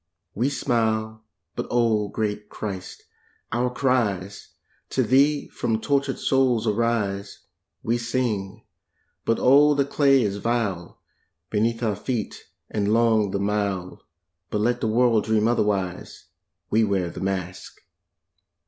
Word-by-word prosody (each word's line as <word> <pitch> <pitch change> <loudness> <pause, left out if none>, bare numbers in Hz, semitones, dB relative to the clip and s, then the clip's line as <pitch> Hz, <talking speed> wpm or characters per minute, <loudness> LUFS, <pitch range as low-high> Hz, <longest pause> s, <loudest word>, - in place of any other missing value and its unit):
We 120 +6 0
smile, 110 -5 -1 0.3
but - - -4
oh 115 -3 +2
great 105 0 -3
Christ, 95 -4 -6 0.5
our 120 +2 +1
cries 110 -7 -1 0.3
To - - +1
Thee 140 +3 +3
from 110 -1 -1
tortured 140 +1 0
souls 130 -4 +2
arise. 105 -3 -1 0.4
We 120 +1 0
sing, 110 -4 -2 0.6
but 115 - +2
oh 145 +3 +5
the 140 -1 +2
clay 135 -2 +3
is 100 -1 -1
vile 105 -6 -2 0.5
Beneath 115 +2 0
our 105 -3 +1
feet, 115 +1 -4 0.2
and 105 -1 -1
long 110 -2 +3
the 100 - -2
mile, 100 -3 -2 0.5
But 105 - -1
let 120 +2 +1
the - - 0
world 115 -1 +3
dream 110 0 +2
otherwise, 100 -6 -1 0.5
We 110 +1 +4
wear 95 -5 0
the - - -8
mask! 95 -2 -4
110 Hz, 125 wpm, -24 LUFS, 100-120 Hz, 0.6 s, oh